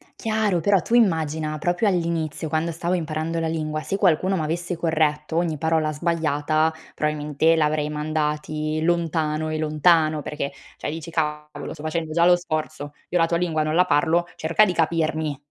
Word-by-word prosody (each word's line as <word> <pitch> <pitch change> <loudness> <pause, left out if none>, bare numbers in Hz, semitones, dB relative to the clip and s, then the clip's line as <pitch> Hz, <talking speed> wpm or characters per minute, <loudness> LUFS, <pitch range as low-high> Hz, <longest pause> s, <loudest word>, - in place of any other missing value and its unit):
Chiaro, 215 -5 0
però 195 +1 +3
tu - - -5
immagina 160 -8 +2
proprio 175 +7 0
all'inizio 165 -3 -1
quando 160 +2 -1
stavo 170 +2 -2
imparando 165 -1 -2
la 165 - -1
lingua, 155 -1 -2
se 195 - -2
qualcuno 185 0 +2
m'avesse 170 +3 -2
corretto 155 -2 0
ogni 170 -3 0
parola 160 0 +1
sbagliata, 155 -1 +1 0.2
probabilmente 150 +1 +1
li 160 - +1
avrei 150 0 +1
mandati 155 0 -2
lontano 160 -2 0
e 155 - -2
lontano, 155 0 +3
perché 140 -1 -4 0.3
cioè - - -4
dici: 165 +1 -7
"Cavolo, 150 -2 -3
sto 150 - -11
facendo 155 0 -2
già 170 +1 +4
lo 180 0 +7
sforzo, 155 -3 -4 0.2
io 180 - +1
la 165 - +5
tua 170 0 0
lingua 165 -3 0
non 155 +1 -1
la 180 +1 +5
parlo, 170 +1 +2
cerca 165 +6 +3
di 180 - -1
capirmi. 160 -3 0
160 Hz, 170 wpm, -23 LUFS, 155-170 Hz, 0.3 s, lo